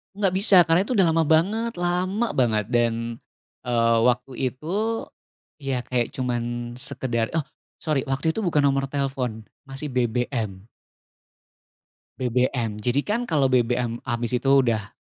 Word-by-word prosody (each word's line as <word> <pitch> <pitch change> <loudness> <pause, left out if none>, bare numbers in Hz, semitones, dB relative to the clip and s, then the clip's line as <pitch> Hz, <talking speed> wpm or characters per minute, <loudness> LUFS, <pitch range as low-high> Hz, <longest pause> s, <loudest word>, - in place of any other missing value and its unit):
Nggak 195 -2 +1
bisa, 200 0 +5
karena 165 +1 +3
itu 255 - -2
udah 190 -5 +4
lama 165 0 +2
banget 205 +9 +2
lama 180 +6 0
banget, 110 -5 +1
dan, 115 -1 0 0.5
eee, 115 -1 +2
waktu 125 +2 0 0.2
itu, 135 +4 -12 0.9
ya, 135 -3 -2
kayak 120 -1 -1
cuman 120 -1 -3
sekedar 120 -4 -1
oh, 160 - +1 0.4
sori, 150 -5 0
waktu 135 +4 0
itu 190 - -4
bukan 155 -4 +2
nomor 135 -1 +2
telepon, 130 -5 -3 0.2
masih 135 +2 -6
BBM. 120 -5 -2 1.5
BBM. 125 -1 0
Jadi, 125 +5 +1
kan, 230 +4 0
kalau 145 -3 +2
BBM 120 -2 0
habis 120 -1 -2
itu 130 +2 +1
udah 115 -6 +3
130 Hz, 135 wpm, -24 LUFS, 120-155 Hz, 1.5 s, bisa